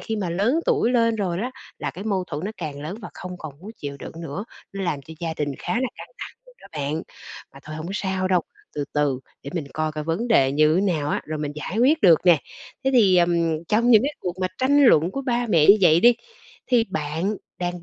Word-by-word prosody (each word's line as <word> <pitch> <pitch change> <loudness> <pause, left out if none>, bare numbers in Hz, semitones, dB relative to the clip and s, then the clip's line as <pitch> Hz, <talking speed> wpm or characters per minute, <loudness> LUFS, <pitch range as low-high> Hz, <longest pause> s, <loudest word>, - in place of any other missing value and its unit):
khi 220 - -3
mà 190 -5 -2
lớn 215 - +1
tuổi 235 - +2
lên 230 -2 +2
rồi 185 -5 -1
đó, 240 +6 -2 0.3
là - - -3
cái 195 - -9
mâu 195 -4 0
thuẫn 150 +2 -5
nó 205 - -2
càng 150 -5 -6
lớn 165 +7 -5
và - - -6
không 180 0 -7
còn 155 -3 -7
muốn 200 +4 -9
chịu 140 -1 -6
đựng - - -8
nữa. 190 +5 -5 0.3
Nó 195 0 -4
làm 150 -5 -2
cho 160 +4 -11
gia 165 -2 -3
đình 145 -1 -2
khá - - -3
là 255 +2 0
căng - - -10
thẳng - - -8
luôn - - -20
đó - - -14
bạn. 150 +1 -2 0.5
Mà 135 - -12
thôi 155 0 -7
hổng 155 +1 -6
sao 190 -2 -1
đâu, 185 -2 +3 0.3
từ 145 - -2
từ 145 -3 +1 0.2
để 140 - -7
mình 165 -5 -3
coi 155 0 -1
coi 150 0 -5
vấn 165 +10 -2
đề 135 - +4
như 155 +2 +4
thế 180 - +3
nào 150 -3 -2
á, - - 0
rồi 155 0 -4
mình 150 -1 -3
giải 155 +7 -4
quyết 285 +7 +4
được 170 -4 +7
nè. 175 -4 +6 0.5
Thế 265 - +3
thì, 200 -7 +5
ừm, 170 -2 +2
trong 225 +7 +2
những 220 -2 +7
cái 285 +3 -1
cuộc 180 -1 -3
mà 185 - +2
tranh 280 +2 +4
luận 170 - +5
của 275 - -4
ba 245 -2 0
mẹ 160 -7 +4
như 200 - +9
vậy 170 -3 +5
đi, 240 +4 +7 0.5
thì 245 -3 +3
bạn 160 +7 -2 0.2
đang 175 -1 -3
175 Hz, 255 wpm, -23 LUFS, 155-220 Hz, 0.5 s, như